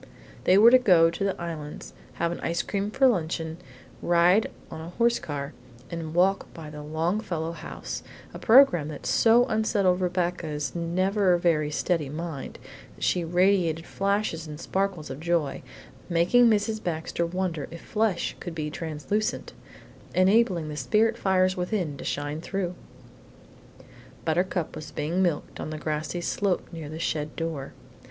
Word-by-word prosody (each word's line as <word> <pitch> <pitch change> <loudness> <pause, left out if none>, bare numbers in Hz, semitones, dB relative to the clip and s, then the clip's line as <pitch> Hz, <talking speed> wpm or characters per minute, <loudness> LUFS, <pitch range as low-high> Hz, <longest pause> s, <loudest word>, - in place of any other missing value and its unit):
They 185 - +6
were 225 +3 +8
to 255 - +8
go 175 -8 +5
to 185 - -4
the 195 -1 -1
Islands, 160 -3 -6 0.2
have 170 0 -1
ice 170 +1 -1
cream 200 0 -2
for 265 +5 +2
luncheon, 165 -6 -1 0.4
ride 175 +5 +4 0.2
on 160 - -6
a 165 - -7
horse 235 +5 +2
car, 145 -3 -5 0.4
and 165 -1 -5
walk 190 +2 +2
by 155 -3 -8
the 150 0 -8
Longfellow 165 +2 -2
house, 170 - -6 0.3
a - - -7
programme 225 - +6
that 150 -2 -8
so 235 +2 +5
unsettled 205 -5 +1
Rebecca's 175 -5 -1
never 185 +2 +2
very 160 -4 +1
steady 150 -1 -1
mind 155 -2 -6 0.4
that - - -9
she 180 - +2
radiated 175 -1 +2
flashes 195 -5 -1
and 150 0 -8
sparkles 190 -3 -2
of 135 - -6
joy, 165 -4 0 0.5
making 180 +9 +4
Mrs. 215 0 +1
Baxter 165 0 -2
wonder 170 -3 -2
if 170 0 -9
flesh 210 -5 0
could 175 -3 -7
be 150 -2 -3
translucent, 160 +7 -3 0.6
enabling 185 -3 +3
the 150 - -6
spirit 215 - +2
fires 185 -3 +2
within 180 -4 -2
to - - -8
shine 145 +2 -3
through? 185 -1 -3 1.5
Buttercup 175 +1 0
was 155 - -7
being 160 +5 -1
milked 170 -5 -1
on - - -4
the 155 - -5
grassy 155 +3 -3
slope 190 +2 -1
near 160 -3 -6
the 155 - -6
shed 155 -2 -2
door. 160 -5 -4
170 Hz, 150 wpm, -26 LUFS, 155-195 Hz, 1.5 s, were